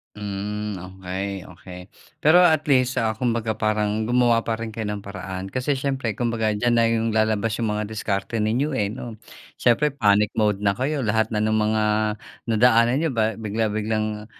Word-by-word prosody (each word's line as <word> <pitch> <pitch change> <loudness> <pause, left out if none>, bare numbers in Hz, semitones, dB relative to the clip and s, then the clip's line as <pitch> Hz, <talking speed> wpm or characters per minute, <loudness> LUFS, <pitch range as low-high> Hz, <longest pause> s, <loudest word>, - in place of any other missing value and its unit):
Hmm, 105 0 -4
okay, 95 +1 -5 0.2
okay. 90 +1 -11 0.4
Pero 160 +4 +7
at 160 -4 +4
least, 130 -1 +3
ah, 110 -1 +1
kumbaga 115 -1 -1
parang 110 0 0
gumawa 120 -1 +4
pa 115 0 -2
rin 115 0 -5
kayo 110 -1 -4
ng 105 -1 -5
paraan. 95 -1 -6
Kasi 130 +5 -1
siyempre 130 -5 -2
kumbaga 115 -3 0
diyan 120 +3 +1
na 115 -1 +4
'yong 115 0 0
lalabas 110 0 +1
'yong 115 -2 0
mga 105 - -2
diskarte 105 +1 -2
ninyo, 120 +8 0
eh, 105 -6 0
'no. 115 0 -7 0.4
Siyempre, 135 +4 +3
panic 105 -5 +3
mode 105 -2 +1
na 100 -1 +3
kayo 135 +4 -2
lahat 110 +1 +1
na 110 - -2
no'ng 110 0 +1
mga 110 0 +1 0.7
nadaanan 115 +1 +4
niyo 160 +2 0
ba 110 -2 +1
bigla-biglang, 110 0 -2
110 Hz, 170 wpm, -23 LUFS, 105-120 Hz, 0.7 s, Pero